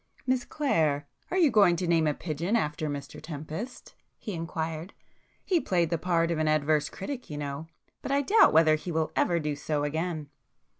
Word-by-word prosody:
"Miss 255 -1 +1
Clare, 155 - 0 0.2
are 370 - -1
you 325 -7 +5
going 200 -6 +5
to 180 - -2
name 165 -2 +3
a 150 - +1
pigeon 170 +6 -2
after 150 -5 -1
Mr 140 0 -6
Tempest?" 160 - -7 0.2
he 210 - -6
inquired—"He 165 - -4
played 175 -3 +1
the 170 - 0
part 170 -1 +1
of 165 - -1
an 155 - +1
adverse 155 0 +2
critic, 250 +6 -6
you 150 - -5
know—but 145 - -7
I 280 +1 +2
doubt 435 +10 +6
whether 155 0 +5
he 155 +3 -2
will 160 -1 0
ever 170 -1 +2
do 150 -2 -2
so 145 0 -2
again!" 155 0 -2
160 Hz, 180 wpm, -28 LUFS, 150-185 Hz, 0.2 s, doubt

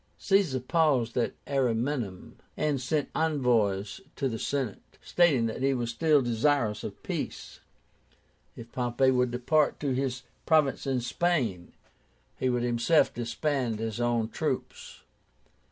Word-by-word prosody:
Caesar 195 -10 +2
paused 130 -4 +1
at 120 - 0
Ariminum, 125 -6 -2 0.2
and 150 -4 0
sent 145 +3 -1
envoys 120 - +1
to 135 - -1
the 115 -3 -4
Senate, 130 -6 -4
stating 155 -10 +3
that 115 +2 -3
he 135 0 +2
was 120 -1 -2
still 150 +2 +3
desirous 120 -2 +1
of - - -8
peace. - - -5 1.0
If 115 0 -11
Pompey 125 +1 +1
would 125 -1 +2
depart 135 +5 +1
to 140 -3 0
his 130 0 -2 0.2
province 155 -4 +2
in 130 -2 0
Spain, 120 - -1 0.6
he 130 - -1
would 125 -1 0
himself 120 +6 +2
disband 120 0 -2
his 110 0 -4
own 120 -2 +1
troops. - - -4
125 Hz, 130 wpm, -28 LUFS, 115-145 Hz, 1.0 s, stating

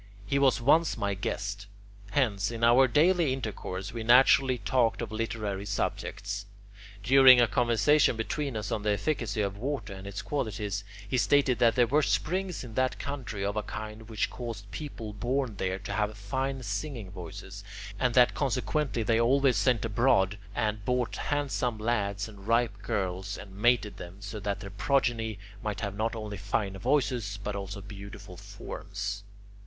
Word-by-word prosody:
He 140 +7 +1
was 135 -3 +4
once 155 +7 +3
my 100 0 0
guest. 100 +1 -4 0.4
Hence, 105 -5 +1
in 115 -1 -5
our 120 +3 +6
daily 160 +3 +3
intercourse, 105 -6 -5
we 115 - -4
naturally 130 +2 +5
talked 115 +2 +1
of - - -4
literary 110 -3 -3
subjects. 100 0 -3 0.6
During 130 +1 +8
a 120 - +5
conversation 120 +5 +3
between 130 +3 -2
us 105 - -4
on 105 - -1
the 105 - 0
efficacy 110 -1 -1
of 100 0 -3
water 135 -4 -3
and 95 +1 -9
its 100 0 -5
qualities, 105 -7 -2 0.2
he 130 - +1
stated 135 -1 +3
that 115 -1 +4
there 125 -2 +5
were 145 +6 +3
springs 180 +3 -1
in 120 -3 -9
that 130 +2 +1
country 125 -8 -4
of 100 +1 -1
a 105 - 0
kind 110 +1 -7
which 110 -3 -1
caused 115 -5 -7
people 115 -8 -6
born 120 +1 -1
there 95 -1 -1
to 100 +2 -6
have 105 0 -1
fine 130 +6 -3
singing 105 -1 -4
voices, 95 +2 -8 0.4
and 125 -2 +1
that 125 -1 +6
consequently 135 -1 -1
they 115 +1 +2
always 135 +1 +4
sent 115 +2 +2
abroad 105 -3 +2 0.2
and 105 -1 -1
bought 125 +1 0
handsome 135 -5 -1
lads 105 -2 -1
and 100 -2 -13
ripe 115 -3 +1
girls, 95 +1 -2
and 95 -1 -11
mated 120 0 +2
them, 90 +2 -9
so 100 +1 -6
that 100 0 -3
their 100 -2 -7
progeny 115 -1 0 0.2
might 105 -1 -3
have 100 -3 -2
not 110 +2 -1
only 105 -2 -5
fine 95 0 -2
voices 125 -4 0
but 105 0 -3
also 100 0 -5
beautiful 100 0 -10
forms. 100 +1 -6
110 Hz, 165 wpm, -29 LUFS, 100-125 Hz, 0.6 s, During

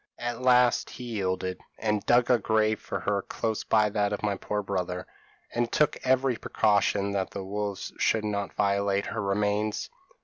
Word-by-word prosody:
At 120 0 -4
last 125 -1 +4
he 125 - -9
yielded, 95 -5 -2 0.2
and 105 -2 0
dug 120 +1 +4
a 120 - +5
grave 110 0 +1
for - - -4
her 100 -1 0
close 110 +2 -3
by 105 -1 +3
that 105 -1 +1
of 105 - -3
my 105 -2 +1
poor 105 +2 -3
brother, 90 -2 -3 0.5
and 120 0 0
took 150 - +3
every 130 -1 +2
precaution 100 -2 +1
that 95 -1 -1
the 100 - -6
wolves 100 0 -4
should 110 -1 +2
not 100 -1 -3
violate 100 0 +1
her 115 - -3
remains. 105 +1 0
105 Hz, 170 wpm, -27 LUFS, 100-115 Hz, 0.5 s, a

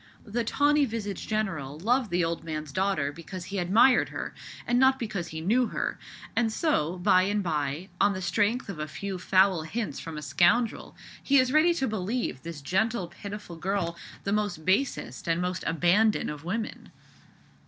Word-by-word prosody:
The 235 +2 -1
tawny 290 +4 +3
visaged 210 -5 -5
general 170 -11 -2
loved 235 +6 +1
the 175 -1 +1
old 165 0 -3
man's 155 -2 -5
daughter 185 -5 0
because 170 +3 -8
he 195 +1 -3
admired 220 +8 +4
her, - - -5 0.3
and 245 +1 +2
not 265 0 +5
because 210 -8 -4
he 160 -1 -6
knew 235 +8 +2
her; - - -3 0.4
and 225 -2 +2
so, 185 - 0
by 185 0 +4
and 205 +2 0
bye, 155 +1 -2
on 205 - +4
the 185 - -4
strength 215 +7 +1
of 195 -6 -6
a 155 - -3
few 195 +4 -5
foul 185 -1 +3
hints 210 +8 -4
from 165 -2 -7
a 150 - -6
scoundrel, 175 - +2 0.3
he 280 - +3
is 255 0 +3
ready 330 +3 +5
to 270 -5 0
believe 215 - -2
this 165 -4 -8
gentle, 195 +2 0
pitiful 200 -1 -8
girl 175 -1 -1 0.3
the 200 - -1 0.3
basest 185 - 0
and 165 0 +1
most 180 0 -2
abandoned 175 +7 +3
of 150 0 -8
women. 215 +6 -4
195 Hz, 175 wpm, -28 LUFS, 170-225 Hz, 0.4 s, not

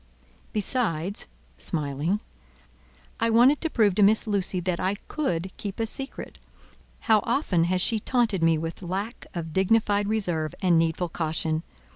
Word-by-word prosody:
Besides" 200 - -1 0.3
(smiling) 150 - -1 1.0
"I 230 - +2
wanted 245 +6 +5
to 325 - +1
prove 215 -8 +3
to 210 - +1
Miss 210 +4 +4
Lucy 195 -3 0
that 180 -1 -2
I 190 +2 0
could 190 - -3
keep 200 0 -6
a 225 - +1
secret. 270 +4 -6 0.6
How 220 -1 +4
often 230 - +1
has 180 +1 +2
she 225 - +2
taunted 225 -5 +1
me 165 -1 +4
with 165 +3 -5
lack 195 +6 -4
of 165 -2 -5
dignified 205 +1 +2
reserve 175 -7 -1
and 180 -5 +3
needful 165 +2 0
caution! 160 -1 -1
190 Hz, 145 wpm, -26 LUFS, 165-220 Hz, 1.0 s, wanted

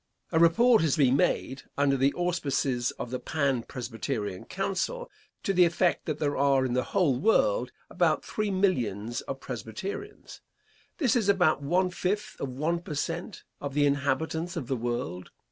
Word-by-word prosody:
A 160 - +3
report 220 +8 +5
has 155 -4 +2
been 135 -3 +4
made, 135 -1 0 0.2
under 140 -1 +3
the 135 +1 +3
auspices 140 -8 0
of 120 - -5
the 125 - -2
Pan 140 -6 0
Presbyterian 115 -5 -4
Council, 195 - -3 0.3
to 195 - 0
the 180 -1 +6
effect 175 +1 +1
that 155 -2 -1
there 145 -2 -1
are 135 -1 +3
in 125 - -1
the 125 0 +1
whole 155 -11 +1
world - - +2 0.2
about - - +1
three 215 -1 -2
millions 120 - 0
of 135 - -6
Presbyterians. 130 - -7 0.6
This 260 -7 +2
is 220 -5 +2
about 180 -7 +3
one 180 +6 +1
fifth 195 +3 -2
of 140 - -3
one 155 +7 -1
per 165 -3 -7
cent. 170 +7 -4 0.2
of 140 -1 -5
the 145 -1 +4
inhabitants 145 +4 0
of 160 -7 -3
the 130 - -1
world. 115 -7 -3
145 Hz, 165 wpm, -28 LUFS, 130-180 Hz, 0.6 s, the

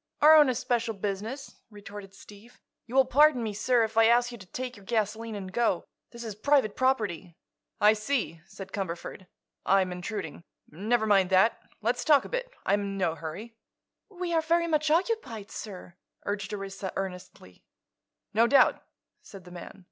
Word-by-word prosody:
"Our 305 +2 +8
own 300 -3 +7
especial 235 -2 -1
business," 210 +8 -5
retorted 205 -2 -11
Steve. 210 +5 -16 0.3
"You 240 - -8
will 270 -1 +6
pardon 285 -2 +4
me, 215 -2 -3
sir, 235 +3 +2
if 220 0 -4
I 225 0 +7
ask 240 +1 +3
you 240 - -8
to 185 - -13
take 250 +5 -5
your 205 - -15
gasoline 220 +1 -2
and 190 -2 -7
go. 230 -6 +1 0.2
This 235 -1 -10
is 220 -2 -5
private 220 0 +2
property." 205 -10 -1 0.4
"I 210 +1 +6
see," 215 - -2
said 190 0 -10
Cumberford. 185 0 -5 0.4
"I'm 190 -1 +2
intruding. 180 -2 -6 0.3
Never 220 +7 0
mind 195 -3 +3
that. 190 +4 +3 0.2
Let's 245 +2 0
talk 290 -3 +4
a - - -8
bit; - - -3 0.2
I'm 205 +1 +2
in 200 -1 -4
no 170 -4 +1
hurry." 165 +8 -8 0.6
"We 360 -3 -4
are 325 - +3
very 335 +2 +2
much 305 -2 +1
occupied, 310 - -1
sir," 185 -4 -8 0.3
urged 200 -1 -3
Orissa, 195 -1 -5
earnestly. 180 - -7 0.7
"No 230 +2 +4
doubt," 275 +3 +4 0.4
said 195 -2 -13
the 180 - -14
man. 175 +2 -10
215 Hz, 170 wpm, -28 LUFS, 195-250 Hz, 0.7 s, Our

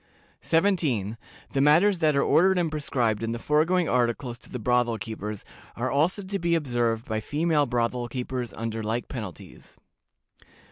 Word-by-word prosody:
"17. 155 - +1 0.4
The 135 - +1
matters 170 +7 +5
that 155 -3 +3
are 140 - +3
ordered 190 +3 +4
and 170 -3 0
prescribed 125 -8 -1
in 115 0 -2
the - - -3
foregoing 160 +7 +2
articles 120 0 0
to - - -13
the - - -5
brothel 120 0 +1
keepers, 105 0 -6 0.3
are 125 +2 -2
also 165 +8 +1
to 195 +1 -3
be 170 0 +1
observed 120 -6 0
by 110 -1 -2
female 150 +5 +1
brothel 120 0 -1
keepers 125 -1 -4
under 115 0 -4
like 110 +3 -2
penalties. 105 - -9
125 Hz, 155 wpm, -26 LUFS, 115-160 Hz, 0.4 s, matters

